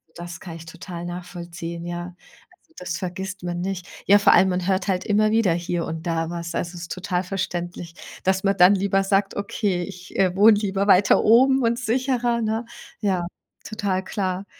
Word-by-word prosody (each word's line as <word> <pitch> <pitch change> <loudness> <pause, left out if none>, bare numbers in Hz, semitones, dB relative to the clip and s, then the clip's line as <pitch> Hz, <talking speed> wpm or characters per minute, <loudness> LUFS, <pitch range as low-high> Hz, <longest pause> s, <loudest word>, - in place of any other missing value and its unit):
das 175 0 -8
kann 170 -3 -8
ich 165 - -12
total 170 +1 -8
nachvollziehen, 170 -1 -7
ja. 175 +1 -5 0.6
Das 180 -1 -4
vergisst 190 +1 -5
man 175 0 -3
nicht. 185 -1 -4 0.2
Ja, 205 +1 +6
vor 200 - +5
allem, 190 - +5
man 180 0 -1
hört 190 +1 0
halt 185 -1 0
immer 215 +1 +2
wieder 220 -6 +3
hier 170 0 -2
und 160 +1 -6
da 165 -1 -1
was. 170 0 -5
Also, 175 +1 -3
es 175 - -8
ist 170 - -9
total 185 0 -2
verständlich, 175 -2 -4 0.3
dass 190 +1 +1
man 195 0 +1
dann 180 +3 +7
lieber 195 0 +1
sagt: 195 0 +1
„Okay, 200 -3 -1
ich, 180 -1 -9
äh, 185 -1 +3
wohne 210 +2 +7
lieber 200 -1 -1
weiter 195 0 +5
oben 265 +4 +5
und 235 +1 +1
sicherer.“ 245 -1 0
Ne? 220 +1 -1 0.3
Ja, 190 -4 0 0.4
total 200 -4 -2
klar. 190 0 -3
185 Hz, 185 wpm, -23 LUFS, 175-200 Hz, 0.6 s, dann